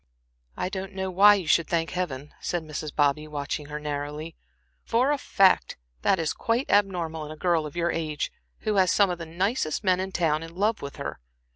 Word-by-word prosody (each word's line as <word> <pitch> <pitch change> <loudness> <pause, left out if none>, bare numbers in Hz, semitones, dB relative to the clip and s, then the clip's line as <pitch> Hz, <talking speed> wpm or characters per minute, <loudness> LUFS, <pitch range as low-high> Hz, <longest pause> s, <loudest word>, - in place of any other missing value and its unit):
"I - - -1
don't 190 0 -5
know 190 0 -3
why 205 +3 +7
you 190 -4 -3
should 165 0 +3
thank 165 -1 0
Heaven," 150 -6 -4
said 175 -2 -2
Mrs. 155 0 -5
Bobby, 145 +1 +2
watching 145 0 -4
her 150 +1 -5
narrowly, 150 +2 -4 0.5
"for 250 +5 +2
a 295 - +2
fact 195 -6 +3 0.2
that - - +3
is 165 -3 -1
quite 235 +4 -1
abnormal 175 -6 +1
in - - -8
a 155 - -8
girl 170 -3 +1
of 145 - -11
your 170 0 +1
age, 155 -2 -2 0.3
who 215 -2 0
has 185 -1 +5
some 200 -3 +4
of 175 - -4
the 165 - -6
nicest 185 +1 -1
men 185 -2 +3
in 190 +1 -3
town 160 -4 +1
in 165 +1 -9
love 210 +4 +1
with 140 0 -6
her. - - -5
170 Hz, 210 wpm, -26 LUFS, 155-190 Hz, 0.5 s, why